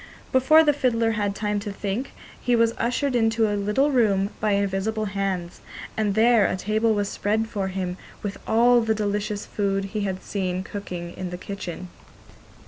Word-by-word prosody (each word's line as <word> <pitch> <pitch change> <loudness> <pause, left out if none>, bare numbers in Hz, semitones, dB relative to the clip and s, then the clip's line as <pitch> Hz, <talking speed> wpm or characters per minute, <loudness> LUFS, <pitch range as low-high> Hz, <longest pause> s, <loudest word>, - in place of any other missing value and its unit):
Before 285 +5 +6
the 295 -2 +4
fiddler 230 -5 +1
had 205 -2 -1
time 210 -1 -1
to 205 0 -5
think, 205 +6 -4 0.3
he 245 -1 +2
was 230 0 +3
ushered 250 +3 0
into 225 -1 +3
a 205 - -1
little 210 +8 +1
room 205 -6 +2
by 210 -1 +1
invisible 200 +2 0
hands, 195 -3 -3 0.3
and 210 -2 0
there 225 -1 +5
a - - -1
table 215 +3 +1
was 205 -1 0
spread 215 +3 -1
for 200 -4 -2
him 185 -1 -3 0.3
with 200 -1 -4
all 240 +2 +5
the 225 -1 +1
delicious 205 0 -2
food 195 -1 -1
he 210 +2 -3
had 190 -2 -3
seen 185 -2 -2
cooking 180 -4 -6
in 185 -1 -5
the 180 - -5
kitchen. 185 -2 -6
210 Hz, 175 wpm, -24 LUFS, 195-225 Hz, 0.3 s, Before